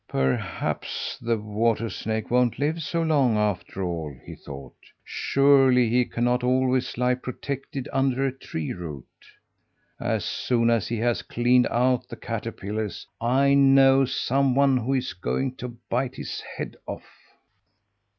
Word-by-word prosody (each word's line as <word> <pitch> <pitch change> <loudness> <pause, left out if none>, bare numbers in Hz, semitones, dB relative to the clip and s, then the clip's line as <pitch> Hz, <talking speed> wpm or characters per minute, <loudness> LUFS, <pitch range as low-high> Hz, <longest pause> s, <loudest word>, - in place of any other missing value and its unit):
"Perhaps 65 -1 -2
the 115 -1 0
water 110 +2 0
snake 110 +3 -4
won't 125 -1 +2
live 155 +5 -1
so 165 +3 -1
long, 140 -8 +3
after 95 -2 -1
all!" 80 -5 -4
he - - -8
thought. 70 -3 -10 0.3
"Surely 135 -3 +4
he 125 +1 +3
cannot 120 +1 0
always 130 0 +1
lie 125 0 +2
protected 135 +2 -5
under 135 0 +1
a 135 - +1
tree 80 - -5
root. 75 -7 -7 0.9
As - - -1
soon 120 -2 +1
as 115 -4 +1
he 115 - -2
has 120 +1 0
cleaned 125 +1 +2
out 125 +1 +1
the - - -6
caterpillars, 110 -2 -5 0.2
I 135 +4 +3
know 135 -1 +6
some 135 +1 +1
one 140 -1 +4
who 125 +2 0
is 130 -1 -2
going 130 +8 -2
to 120 -1 -7
bite 125 +1 0
his - - -5 0.2
head - - -5
off!" - - -6
125 Hz, 140 wpm, -25 LUFS, 110-135 Hz, 0.9 s, know